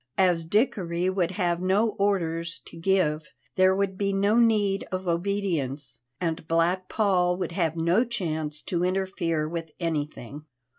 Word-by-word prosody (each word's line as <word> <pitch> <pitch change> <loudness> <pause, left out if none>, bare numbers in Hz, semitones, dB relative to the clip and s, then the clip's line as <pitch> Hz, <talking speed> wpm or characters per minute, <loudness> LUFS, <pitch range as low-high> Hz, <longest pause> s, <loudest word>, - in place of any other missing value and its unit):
As 180 -3 +3
Dickory 185 -3 +1
would 185 -3 0
have 180 -2 -1
no 195 +5 +2
orders 170 -5 -1
to - - -13
give, 165 -3 +1 0.3
there 185 0 +4
would 195 -1 -1
be 200 -1 +1
no 200 +2 +2
need 210 -4 +3
of 185 0 -3
obedience, 170 -6 -2 0.2
and 165 -3 -3
Black 175 +3 +1
Paul 180 -4 +2
would 185 - -3
have 165 -3 0
no 170 +8 +3
chance 160 -10 -3
to 175 -1 -1
interfere 180 -4 -1
with 165 0 -5
anything. 150 -4 -4
180 Hz, 145 wpm, -26 LUFS, 165-195 Hz, 0.3 s, there